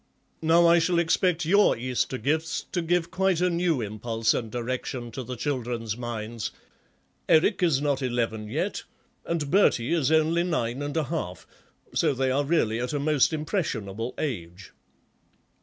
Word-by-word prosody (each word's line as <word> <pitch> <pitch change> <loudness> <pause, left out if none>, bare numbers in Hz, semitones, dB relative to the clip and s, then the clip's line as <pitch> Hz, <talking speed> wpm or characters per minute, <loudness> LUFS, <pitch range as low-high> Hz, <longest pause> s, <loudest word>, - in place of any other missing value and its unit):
Now 165 +2 +5
I 170 0 +6
shall 170 +1 +1
expect 170 0 +2
your 200 - +4
Easter 130 +2 -1
gifts 150 +5 -1
to 175 - 0
give 170 0 0
quite 185 -1 +1
a 180 0 +2
new 170 -5 +1
impulse 110 +1 -1
and 115 -3 -3
direction 120 +1 -4
to 130 - -5
the 125 +1 -6
children's 120 -4 -3
minds; 115 -1 -4 0.8
Eric 170 +5 +4
is 160 -7 +3
not 145 -2 0
eleven 115 -4 -1
yet, 155 - -2 0.5
and 160 -4 -2
Bertie 170 - +3
is 155 -4 +1
only 160 +2 +3
nine 140 -8 -1
and 145 +2 -3
a 160 - +2
half, 145 - -4 0.5
so 140 - +2
they 130 0 +1
are 140 +2 +1
really 135 -8 +1
at 125 +4 -3
a 145 - 0
most 145 -1 +3
impressionable 125 - -3
age." 95 - -5
140 Hz, 155 wpm, -26 LUFS, 120-165 Hz, 0.8 s, I